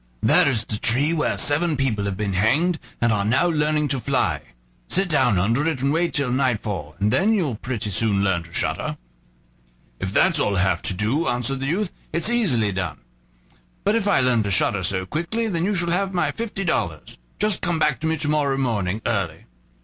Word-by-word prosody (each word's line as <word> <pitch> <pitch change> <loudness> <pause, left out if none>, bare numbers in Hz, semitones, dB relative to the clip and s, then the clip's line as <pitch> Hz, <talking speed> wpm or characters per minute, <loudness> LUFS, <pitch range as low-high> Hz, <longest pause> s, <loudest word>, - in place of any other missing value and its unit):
there - - +5
is 115 -5 0
the 105 - -2
tree 135 +9 +2
where 155 -2 0
seven 150 +2 +2
people 115 -7 0
have 100 -2 -3
been 100 -2 -2
hanged, 145 - +2 0.2
and 120 -1 +2
are 100 -2 0
now 125 +11 +2
learning 150 -2 +1
to 135 -1 -1
fly; - - 0 0.5
sit 190 +1 +2
down 125 - +2
under 115 - +1
it 160 -5 -1
and 140 +1 +2
wait 170 +2 +1
till 140 -4 -1
nightfall, 105 - -1
and 105 +3 +1
then 205 +10 +3
you'll 165 - 0
pretty 110 -2 -4
soon 100 0 +1
learn 95 -3 +1
to 85 0 -15
shudder." - - -2 1.0
"If 95 - -3
that's 170 - +3
all 100 -7 +1
I - - +2
have 95 -3 +1
to 95 - -1
do," 110 - 0
answered 125 +2 -1
the 135 - -3
youth, 185 +5 -1 0.2
"it's 170 +8 +2
easily 130 - +1
done; 90 -6 -3 0.9
but 205 - +2
if 220 -3 0
I 195 -8 +3
learn 125 -3 +2
to 100 - -2
shudder 100 0 +2
so 95 +1 -1
quickly, 170 - -2
then 170 -4 -1
you 205 +1 0
shall 170 -1 -1
have 190 +2 -1
my 175 - +1
fifty 225 -4 -4
dollars. 95 - -2 0.2
Just 210 -2 +1
come 175 -2 0
back 150 -1 +1
to 160 - -2
me 160 0 0
to 150 - -1
morrow 145 -2 +1
morning 110 -6 -1
early." 95 -8 -2
135 Hz, 210 wpm, -22 LUFS, 105-170 Hz, 1.0 s, there